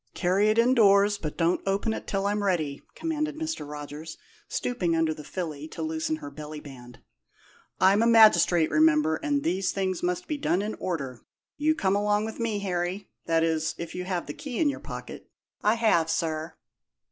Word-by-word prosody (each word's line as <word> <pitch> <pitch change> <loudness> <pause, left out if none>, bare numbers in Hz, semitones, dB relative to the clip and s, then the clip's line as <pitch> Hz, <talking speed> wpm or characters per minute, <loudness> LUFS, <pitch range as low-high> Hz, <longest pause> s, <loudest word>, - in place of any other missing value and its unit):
"Carry 190 +4 +2
it 215 - +2
indoors, 205 -4 +5
but 150 -5 -5
don't 170 +1 +2
open 200 +3 0
it - - -6
till 195 0 -1
I'm 205 +1 0
ready," 160 -8 -1
commanded 305 -2 -2
Mr. 315 - -4
Rogers, 150 +2 -8 0.3
stooping 180 -9 -1
under 160 -1 +1
the 155 - -10
filly 155 -3 -5
to 160 - -6
loosen 160 0 -1
her 145 -2 -9
belly 150 +1 -8
band. 125 -4 -12 0.8
"I'm 195 +3 +5
a 230 - +4
magistrate, 215 -7 +6
remember, 155 0 +4
and 285 -2 -1
these 185 +2 0
things 190 -2 -2
must 180 0 -2
be 305 - -2
done 200 -9 0
in 215 +1 -3
order. 140 -9 -4 0.3
You 310 +1 +1
come 195 -9 +1
along 205 +1 +1
with 220 +1 -7
me, 230 -2 -1
Harry; 180 +1 -3 0.2
that 165 0 +2
is, 160 -1 0
if 170 -1 -6
you 180 0 -4
have 180 -2 -2
the 145 - -6
key 260 - -6
in 310 - +3
your 280 - -4
pocket." - - -9 0.3
"I 210 +2 +3
have, 215 -8 +2
sir." 160 0 -2
180 Hz, 185 wpm, -27 LUFS, 160-210 Hz, 0.8 s, magistrate